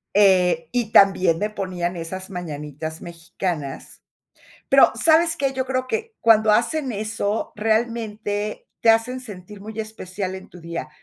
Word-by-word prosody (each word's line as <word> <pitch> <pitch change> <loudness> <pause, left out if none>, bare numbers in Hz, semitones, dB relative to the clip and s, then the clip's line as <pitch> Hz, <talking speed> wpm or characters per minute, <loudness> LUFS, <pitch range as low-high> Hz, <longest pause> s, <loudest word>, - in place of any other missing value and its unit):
Eh, 180 -5 +4
y 235 -3 -1
también 190 -5 +5
me 210 - -1
ponían 185 -4 -3
esas 185 +3 -6
mañanitas 155 -3 -6
mexicanas. 165 -3 -5 0.7
Pero, - - +6
¿sabes 325 +1 +4
qué?, 275 -1 0
yo 260 -1 -2
creo 255 0 -2
que 450 - -3
cuando 220 -1 +5
hacen 260 +4 +1
eso, 215 0 -2
realmente 220 -1 -1
te 230 - +6
hacen 235 +3 +1
sentir 205 -4 -10
muy 220 +2 -9
especial 190 -3 -5
en 190 - -9
tu 180 - -14
día. 170 -1 -5
205 Hz, 140 wpm, -22 LUFS, 180-225 Hz, 0.7 s, Pero